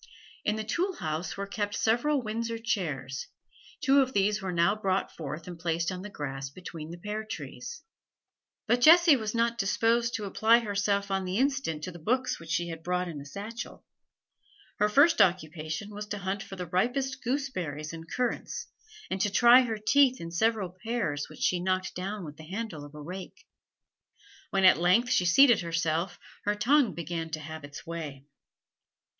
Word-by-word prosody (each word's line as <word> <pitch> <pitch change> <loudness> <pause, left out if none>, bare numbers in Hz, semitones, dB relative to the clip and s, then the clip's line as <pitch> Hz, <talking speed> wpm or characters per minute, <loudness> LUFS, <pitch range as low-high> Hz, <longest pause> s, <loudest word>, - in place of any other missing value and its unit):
In 210 - +1
the 220 - -3
tool 350 - -1
house 155 +4 -3
were 200 - -3
kept 205 0 -3
several 250 +5 +2
Windsor 230 +1 -3
chairs; 150 - -3 0.5
two 275 +1 +5
of 260 0 -1
these 205 +2 +2
were 190 -1 -3
now 170 +3 +3
brought 195 -2 -1
forth 155 0 -6
and 175 -2 -8
placed 170 +1 0
on 185 0 -5
the 205 - -7
grass 135 -6 -5
between 160 0 -9
the 170 - -7
pear 210 +4 -4
trees. 255 - -7 0.8
But 245 +1 +2
Jessie 330 +1 +8
was 220 -3 -3
not 235 0 +1
disposed 230 +4 +2
to 215 - -3
apply 220 +4 +4
herself 200 -2 0
on 195 0 0
the 185 +1 -2
instant 265 - 0
to 185 - -4
the 175 - -11
books 255 +9 0
which 165 -1 -12
she 170 +2 0
had 165 -1 -6
brought 180 +1 -1
in 155 -4 -6
a - - -10
satchel; 210 +9 -7 0.9
her 210 - +3
first 285 +10 +5
occupation 160 +2 0
was 210 0 -6
to 205 - -4
hunt 195 +1 -3
for 195 - -8
the 180 -1 -5
ripest 255 - -1
gooseberries 185 - -3
and 165 0 -9
currants, 250 -1 -2 0.4
and 190 - -1
to 205 - +2
try 240 +5 +7
her 230 -3 -2
teeth 260 +4 +4
in 170 0 -6
several 205 0 +1
pears 215 -11 -2
which - - -12
she 180 - +2
knocked 185 +1 -1
down 195 +1 -4
with 150 -1 -9
the 155 - -11
handle 195 -7 -5
of 145 +1 -12
a - - -8
rake. 185 +4 -8 1.0
When 195 -2 +2
at 185 - +7
length 195 +8 +3
she 180 - +3
seated 240 +5 +6
herself, 165 +1 -1 0.3
her 205 0 +1
tongue 245 0 +3
began 165 0 -4
to 160 -1 -4
have 160 0 -8
its 145 +3 -9
way. 155 -5 -6
195 Hz, 185 wpm, -29 LUFS, 165-230 Hz, 1.0 s, Jessie